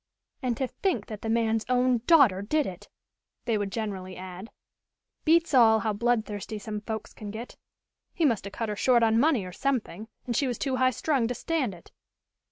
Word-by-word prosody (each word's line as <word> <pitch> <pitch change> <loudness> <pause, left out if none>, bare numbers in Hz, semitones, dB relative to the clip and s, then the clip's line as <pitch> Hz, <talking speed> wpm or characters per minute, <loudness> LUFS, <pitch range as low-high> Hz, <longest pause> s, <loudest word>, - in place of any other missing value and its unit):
"And 245 -4 -1
to 265 - 0
think 290 - -2
that 215 -2 -8
the 225 - -4
man's 225 -1 +1
own 250 -1 +3
daughter 270 - +6
did 295 +8 +1
it," 180 -2 -8 0.6
they 230 - +1
would 205 -2 -2
generally 195 -4 -4
add. 185 +3 -8 0.8
"Beats 330 0 +3
all 220 -4 +6
how 215 -2 0
bloodthirsty 220 -2 -1
some 210 0 -5
folks 220 +1 -6
can 210 - -8
get. 225 +4 -7 0.6
He 335 - 0
must 230 -8 +1
have 200 - -7
cut 225 -2 -3
her 210 - -2
short 240 +2 +3
on 225 0 +4
money 265 -7 +3
or 180 - -7
something 220 -3 -2 0.2
and 240 - -2
she 275 - +2
was 245 -3 -2
too 265 -2 -1
high 255 0 +4
strung 260 -2 0
to 245 - -3
stand 265 - -1
it." 170 - -17
225 Hz, 195 wpm, -27 LUFS, 210-255 Hz, 0.8 s, daughter